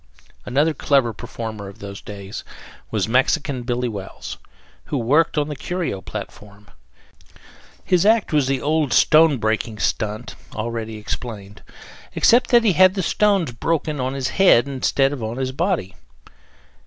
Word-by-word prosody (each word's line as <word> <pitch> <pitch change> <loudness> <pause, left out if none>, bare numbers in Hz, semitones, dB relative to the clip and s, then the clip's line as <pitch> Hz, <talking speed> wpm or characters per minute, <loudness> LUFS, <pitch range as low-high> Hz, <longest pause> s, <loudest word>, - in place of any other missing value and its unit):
Another 145 +6 +2
clever 135 -5 +1
performer 110 -2 -7
of 100 - -11
those 100 0 -8
days 100 -1 -8 0.5
was - - -1
Mexican 130 +2 +1
Billy 125 0 -2
Wells, 100 -4 -7 0.5
who 145 - -3
worked 145 +8 +2
on 145 -1 +1
the 150 - -5
Curio 170 - -3
platform. 105 +2 -9 1.2
His 180 -2 +3
act 215 -4 +3
was 145 -3 +3
the 135 -1 -1
old 150 -4 +1
stone 155 -2 +5
breaking 110 0 -1
stunt, 110 +2 -2 0.2
already 110 0 -4
explained, 105 -1 -7 0.5
except 240 +2 +4
that 240 -2 +5
he 210 -5 +3
had 185 +2 +5
the 190 - -1
stones 195 -5 +2
broken 150 +4 -2
on 130 +1 -2
his 135 -1 -2
head 145 -7 +4
instead 135 0 +1
of 140 - -6
on 110 +2 -4
his 130 -1 -2
body. 160 - -1
130 Hz, 145 wpm, -21 LUFS, 110-160 Hz, 1.2 s, stone